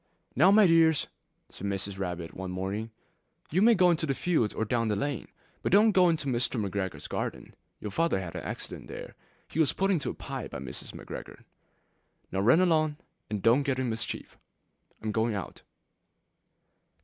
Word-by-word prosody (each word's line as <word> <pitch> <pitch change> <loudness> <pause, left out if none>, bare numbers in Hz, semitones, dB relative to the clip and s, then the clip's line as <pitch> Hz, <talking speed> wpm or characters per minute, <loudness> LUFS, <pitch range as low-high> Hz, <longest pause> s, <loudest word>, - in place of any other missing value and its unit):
'Now 185 - +6
my 210 +1 +7
dears,' 165 -3 +5 0.4
said - - -10
old - - 0
Mrs. 95 0 -3
Rabbit 90 -3 -4
one 95 0 -5
morning, 95 +5 -3 0.6
'you 180 +5 +2
may 230 +2 +7
go 180 -2 +5
into 160 -1 0
the 135 - 0
fields 155 -12 +1
or 110 - -2
down 115 +1 0
the 105 - +1
lane, 135 +3 -2 0.3
but - - -1
don't 210 +3 +6
go 185 -3 +5
into 160 -3 0
Mr. 125 -2 0
McGregor's 100 -2 -3
garden: - - -4 0.3
your 105 - -5
Father 165 -4 +1
had 90 -3 -6
an - - -3
accident - - -5
there; - - -8 0.3
he 160 - -5
was 155 -4 +4
put 195 +1 +1
in 175 -6 +2
a - - -2
pie - - -5
by - - -7
Mrs. 65 -2 -7
McGregor.' - - -9 0.9
'Now 95 - -1
run 125 - +5
along, 155 -4 +2 0.3
and 105 -2 -3
don't 120 +5 +5
get 135 -2 0
into 130 -2 0
mischief. 115 +1 -4 0.6
I - - -8
am 110 - 0
going 110 0 +1
out.' 100 - -6
125 Hz, 185 wpm, -29 LUFS, 100-165 Hz, 0.9 s, my